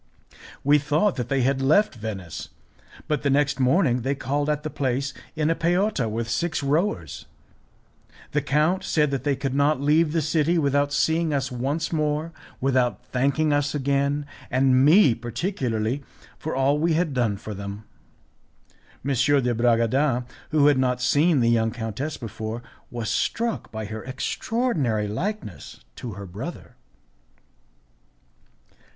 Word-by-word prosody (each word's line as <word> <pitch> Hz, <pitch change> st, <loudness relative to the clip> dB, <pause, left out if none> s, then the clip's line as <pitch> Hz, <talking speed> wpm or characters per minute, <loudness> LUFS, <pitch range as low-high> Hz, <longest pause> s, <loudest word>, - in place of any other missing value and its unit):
We 145 Hz, +2 st, +5 dB
thought 150 Hz, +7 st, +1 dB
that 125 Hz, -1 st, -3 dB
they 135 Hz, -1 st, +1 dB
had 135 Hz, +2 st, +1 dB
left 155 Hz, +11 st, +3 dB
Venice, 100 Hz, -, -6 dB, 0.6 s
but 150 Hz, -, 0 dB
the 140 Hz, -, +1 dB
next 140 Hz, 0 st, +2 dB
morning 130 Hz, -1 st, +3 dB
they 135 Hz, +4 st, -1 dB
called 145 Hz, +2 st, -1 dB
at 150 Hz, 0 st, -1 dB
the 155 Hz, -, -4 dB
place 140 Hz, 0 st, -1 dB, 0.2 s
in 155 Hz, 0 st, +1 dB
a -, -, +4 dB
peotta 175 Hz, -, +1 dB
with 115 Hz, +1 st, -3 dB
six 155 Hz, +6 st, -1 dB
rowers. 140 Hz, -, -1 dB, 1.0 s
The 150 Hz, -, +1 dB
count 150 Hz, +7 st, +1 dB
said 150 Hz, -3 st, +1 dB
that 135 Hz, -3 st, -2 dB
they 145 Hz, -1 st, +1 dB
could 135 Hz, 0 st, -3 dB
not 145 Hz, +1 st, +2 dB
leave 150 Hz, +3 st, +3 dB
the 160 Hz, -1 st, 0 dB
city 155 Hz, +2 st, +2 dB
without 145 Hz, -1 st, +2 dB
seeing 160 Hz, +2 st, +1 dB
us 130 Hz, -2 st, -1 dB
once 140 Hz, +7 st, -2 dB
more; 155 Hz, +1 st, 0 dB, 0.3 s
without 125 Hz, -2 st, +1 dB
thanking 140 Hz, +4 st, +1 dB
us 145 Hz, +1 st, 0 dB
again, 140 Hz, +1 st, 0 dB, 0.2 s
and 130 Hz, 0 st, +3 dB
me 155 Hz, -, +6 dB
particularly, 120 Hz, -, -2 dB, 0.4 s
for 160 Hz, -, -4 dB
all 135 Hz, +2 st, +2 dB
we 165 Hz, +1 st, +2 dB
had 160 Hz, -2 st, 0 dB
done 115 Hz, -6 st, 0 dB
for 105 Hz, +1 st, -7 dB
them. 100 Hz, +1 st, -7 dB, 1.2 s
M. 140 Hz, -, +1 dB
de 130 Hz, -1 st, +2 dB
Bragadin, 120 Hz, +3 st, +2 dB, 0.2 s
who 150 Hz, -2 st, +3 dB
had 145 Hz, -2 st, +5 dB
not 125 Hz, -1 st, +1 dB
seen 145 Hz, +3 st, +3 dB
the 115 Hz, -, +3 dB
young 115 Hz, -1 st, +2 dB
countess 120 Hz, +6 st, -4 dB
before, 115 Hz, 0 st, -6 dB, 0.3 s
was 120 Hz, -2 st, -4 dB
struck 230 Hz, -, -1 dB
by 110 Hz, -1 st, -5 dB
her 110 Hz, +1 st, -6 dB
extraordinary 135 Hz, -, -1 dB
likeness 175 Hz, -, -5 dB, 0.2 s
to 120 Hz, -4 st, -6 dB
her 100 Hz, +1 st, -8 dB
brother. 110 Hz, -, -8 dB
140 Hz, 145 wpm, -24 LUFS, 120-150 Hz, 1.2 s, me